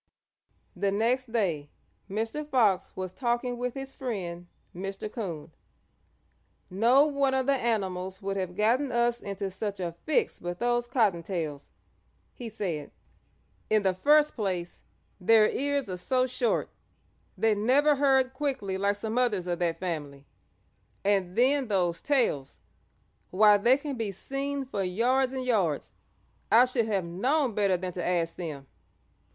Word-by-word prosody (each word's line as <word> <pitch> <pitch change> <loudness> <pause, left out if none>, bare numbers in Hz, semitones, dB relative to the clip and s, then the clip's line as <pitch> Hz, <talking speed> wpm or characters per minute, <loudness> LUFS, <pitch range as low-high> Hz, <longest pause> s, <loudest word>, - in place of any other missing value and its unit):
The 195 +2 0
next 235 +4 0
day 170 -11 -1 0.4
Mr. 225 +9 -2
Fox 235 -10 +2
was 185 -1 -5
talking 240 +2 -1
with 250 -1 -3
his 270 0 -7
friend, 180 -9 -5 0.3
Mr. 195 +3 -5
Coon. 170 -9 -5 1.2
"No 240 +9 +5
one 280 -2 +1
of 260 -1 +1
the 280 - +3
animals 190 -7 -1
would 195 0 -3
have 185 -2 -3
gotten 240 +7 +2
us 240 0 +1
into 200 -1 -4
such 200 +1 -4
a 175 -2 -2 0.2
fix 440 +9 +1
but 175 0 -5
those 240 +1 0
Cottontails," 175 - -1 0.6
he 240 -2 -7
said. 175 -9 -4 0.8
"In 215 -1 +3
the 190 -1 +2
first 295 +9 +4
place, 185 -6 -3 0.4
their 215 +3 +5
ears 280 -2 -1
are 185 -1 -4
so 255 +8 +1
short 250 -2 -1 0.7
they 220 +3 +3
never 265 +8 +3
heard 265 -2 +3
quickly 260 -9 -2
like 200 +1 +1
some 220 +3 -2
others 210 -8 +1
of 175 -1 -2
that 170 -2 -1
family, 145 -6 -5 0.8
and 195 -3 +1
then 265 +2 +3
those 175 -5 0
tails 240 - 0 0.7
why 210 +2 +6
they 245 +6 +5
can 280 -2 -5
be 220 -3 -2
seen 275 +7 -4
for 230 -6 -3
yards 250 +8 +1
and 260 -1 -4
yards. 190 - 0 0.6
I 235 +3 +7
should 250 -3 0
have 195 -5 0
known 250 - 0
better 200 -3 +2
than 180 0 -5
to 180 - -4
ask 170 -2 0
them. 150 -6 -6
215 Hz, 145 wpm, -28 LUFS, 185-255 Hz, 1.2 s, I